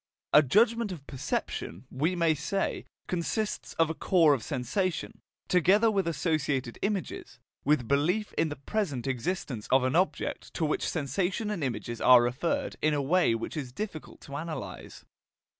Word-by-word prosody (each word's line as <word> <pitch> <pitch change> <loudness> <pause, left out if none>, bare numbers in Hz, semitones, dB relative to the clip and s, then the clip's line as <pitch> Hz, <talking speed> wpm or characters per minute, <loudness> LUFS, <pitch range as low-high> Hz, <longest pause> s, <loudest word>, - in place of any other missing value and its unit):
A 150 - +9
judgment 220 - +3
of 155 -6 -8
perception, 125 - -4
we 155 +8 0
may 165 -2 +3
say, 175 +7 -2 0.2
consists 195 +5 -2
of 165 -1 +2
a - - -2
core 165 -2 +4
of 135 - -1
sensation, 160 - -2 0.3
together 195 +6 +4
with 195 -4 0
associated 145 -6 -1
images, 200 -2 -3 0.3
with 140 -5 +2
belief 175 - +1
in 160 - +1
the 145 - -4
present 145 - -2
existence 130 - -3
of 130 0 +5
an 130 +3 +1
object 185 +3 -1
to 165 - 0
which 150 - 0
sensation 180 - -1
and 185 -7 -3
images 120 -2 -3
are 125 -1 +8
referred 125 +8 -1
in 155 -1 +2
a - - 0
way 145 -3 +3
which 115 - -5
is 135 -5 -4
difficult 180 +1 -7
to 140 - -9
analyse. 155 +2 -6
155 Hz, 160 wpm, -29 LUFS, 135-185 Hz, 0.3 s, A